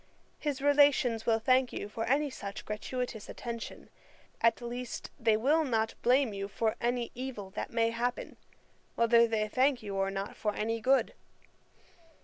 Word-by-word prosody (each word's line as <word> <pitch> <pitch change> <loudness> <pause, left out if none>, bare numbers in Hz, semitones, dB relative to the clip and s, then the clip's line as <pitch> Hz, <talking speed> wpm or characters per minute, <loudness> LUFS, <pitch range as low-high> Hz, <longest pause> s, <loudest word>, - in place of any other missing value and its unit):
His 285 -2 -3
relations 285 -5 +4
will 225 -1 +4
thank 255 +3 +3
you - - -5
for 225 +2 -4
any 280 +3 +1
such 200 -5 -7
gratuitous 220 +1 -4
attention: 235 -1 -7 0.5
at 230 0 +3
least 245 0 -6
they 225 -2 +3
will 295 +8 +3
not 225 -5 0
blame 250 -2 +3
you 200 0 -4
for 220 +2 -1
any 240 0 -1
evil 240 -6 -6
that - - -4
may 230 -1 +1
happen, 240 +2 -3 0.6
whether 235 0 +5
they 215 -2 0
thank 260 +2 +2
you 200 -2 -5
or 195 0 +1
not 195 +1 -4
for 210 -2 -2
any 225 +1 -2
good. 265 +4 +3
235 Hz, 155 wpm, -31 LUFS, 220-255 Hz, 0.6 s, whether